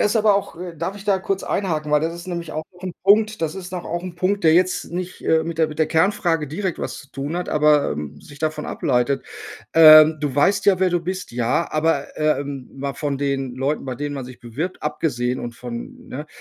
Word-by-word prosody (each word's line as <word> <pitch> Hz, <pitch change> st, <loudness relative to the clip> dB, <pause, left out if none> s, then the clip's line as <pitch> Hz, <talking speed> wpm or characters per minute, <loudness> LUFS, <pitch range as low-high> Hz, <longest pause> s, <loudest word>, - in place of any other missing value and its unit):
Das -, -, +4 dB
ist 210 Hz, -, +1 dB
aber 210 Hz, -2 st, +4 dB
auch 195 Hz, -4 st, -3 dB
äh, 180 Hz, -2 st, -6 dB
darf 190 Hz, +6 st, -3 dB
ich 200 Hz, -, -11 dB
da 200 Hz, -2 st, +2 dB
kurz 195 Hz, 0 st, -2 dB
einhaken? 155 Hz, -6 st, -1 dB
Weil 150 Hz, -, +5 dB
das 165 Hz, +2 st, -2 dB
ist 170 Hz, +1 st, -9 dB
nämlich 170 Hz, -3 st, -5 dB
auch 155 Hz, +1 st, -4 dB
noch 180 Hz, 0 st, -19 dB
'n 185 Hz, -2 st, -4 dB
Punkt 215 Hz, +2 st, +4 dB
das 160 Hz, 0 st, -1 dB
ist 190 Hz, -1 st, -7 dB
noch 180 Hz, -1 st, -5 dB
auch 175 Hz, +1 st, -3 dB
'n 180 Hz, -1 st, -7 dB
Punkt, 195 Hz, +3 st, 0 dB
der 160 Hz, 0 st, +6 dB
jetzt 185 Hz, +1 st, +1 dB
nicht, 180 Hz, 0 st, -5 dB
äh, 160 Hz, 0 st, +3 dB
mit 165 Hz, -1 st, -4 dB
der 160 Hz, -1 st, +3 dB
mit 150 Hz, -, -9 dB
der 155 Hz, -, +3 dB
Kernfrage 165 Hz, -2 st, +1 dB
direkt 180 Hz, +4 st, -3 dB
was -, -, -4 dB
zu 135 Hz, -, -13 dB
tun 140 Hz, +6 st, -4 dB
hat, 180 Hz, -, -3 dB
aber, 150 Hz, -1 st, +3 dB
ähm, 75 Hz, -1 st, -6 dB
sich 145 Hz, -1 st, -14 dB
davon 155 Hz, -1 st, -2 dB
ableitet. 130 Hz, 0 st, 0 dB, 0.5 s
Ähm, 155 Hz, -1 st, +9 dB
du 145 Hz, -3 st, -2 dB
weißt 145 Hz, +8 st, +2 dB
ja, 190 Hz, -2 st, +4 dB
wer 185 Hz, -, +3 dB
du 175 Hz, -, +2 dB
bist. 185 Hz, +2 st, -5 dB
Ja, 120 Hz, +7 st, 0 dB
aber, 160 Hz, +1 st, +1 dB
ähm, 145 Hz, -3 st, -1 dB
mal 140 Hz, 0 st, -4 dB
von 140 Hz, -3 st, -2 dB
den 135 Hz, -3 st, -2 dB
Leuten, 135 Hz, +4 st, -1 dB
bei 130 Hz, -2 st, -4 dB
denen 145 Hz, +2 st, -4 dB
man 135 Hz, -, -5 dB
sich 125 Hz, -1 st, -12 dB
bewirbt, 145 Hz, +11 st, -5 dB
abgesehen 130 Hz, -5 st, -1 dB
und 120 Hz, -1 st, -6 dB
von, 120 Hz, -1 st, -8 dB
ne? 145 Hz, +4 st, -6 dB
155 Hz, 240 wpm, -22 LUFS, 140-180 Hz, 0.5 s, Ähm